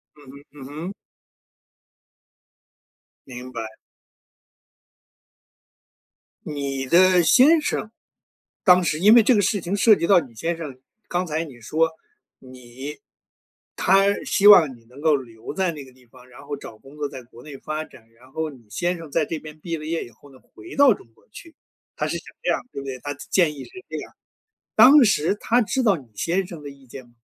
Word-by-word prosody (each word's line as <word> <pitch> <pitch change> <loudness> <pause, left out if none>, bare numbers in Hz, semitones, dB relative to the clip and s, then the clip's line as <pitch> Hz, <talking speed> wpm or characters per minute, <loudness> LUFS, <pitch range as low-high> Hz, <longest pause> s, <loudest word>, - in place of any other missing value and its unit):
嗯 145 -3 -15
哼 140 +1 -15
嗯 140 -3 -12 0.2
哼。 - - -7 2.3
明 125 0 -9
白。 115 -2 -5 2.8
你 140 -3 -4
的 180 +3 +5
先 295 - +5
生 220 - -3 0.7
当 180 -1 +5
时 155 -2 -1
因 210 +6 +6
为 235 - +7
这 245 +3 +4
个 205 - +3
事 205 +1 +1
情 180 +3 -4
涉 210 +1 +5
及 170 - -1
到 190 -3 +5
你 125 -6 -13
先 165 +10 -2
生， 140 -6 -8 0.3
刚 180 +1 -1
才 160 +1 -2
你 135 -7 -13
说， 160 +7 +1 0.5
你 130 +2 -10 0.8
他 195 +1 +3
希 200 - +1
望 160 -11 +7
你 115 - -23
能 125 +4 -15
够 155 -1 +3
留 115 -2 -9
在 185 0 0
那 150 -3 -9
个 130 - -14
地 130 0 -24
方， 125 +1 -19
然 125 0 -15
后 145 - -4
找 110 - -11
工 135 +6 -17
作 145 -1 -2
在 130 -2 -10
国 120 0 -17
内 145 -2 -10
发 155 +3 -5
展， 115 -6 -19
然 120 +3 -22
后 160 +1 -3
你 125 -6 -17
先 175 - -2
生 165 -3 -11
在 155 +2 +1
这 160 - -5
边 155 0 -12
毕 165 0 -4
了 155 - -9
业 165 +1 -2
以 - - -13
后 135 +5 -20
呢， 130 - -17 0.2
回 355 - -11
到 280 -4 +6
中 195 - -8
国 - - -28
去， 330 +8 -13 0.4
他 - - -2
是 - - -3
想 - - -13 0.2
这 - - 0
样， - - 0
对 140 - -7
不 - - -9
对？ 130 -2 -6
他 145 0 -4
的 145 - -19
建 170 -5 +2
议 140 - -9
是 - - -16 0.2
这 - - -6
样。 - - -9 0.6
当 280 +2 +8
时 195 -5 +2
他 240 +2 +2
知 260 +5 -1
道 210 -7 +3
你 135 -5 -14
先 180 - -1
生 170 -5 -10
的 145 - -8
意 140 -1 -16
见 130 +1 -11
吗？ 120 - -25
150 Hz, 215 characters per minute, -22 LUFS, 130-185 Hz, 2.8 s, 当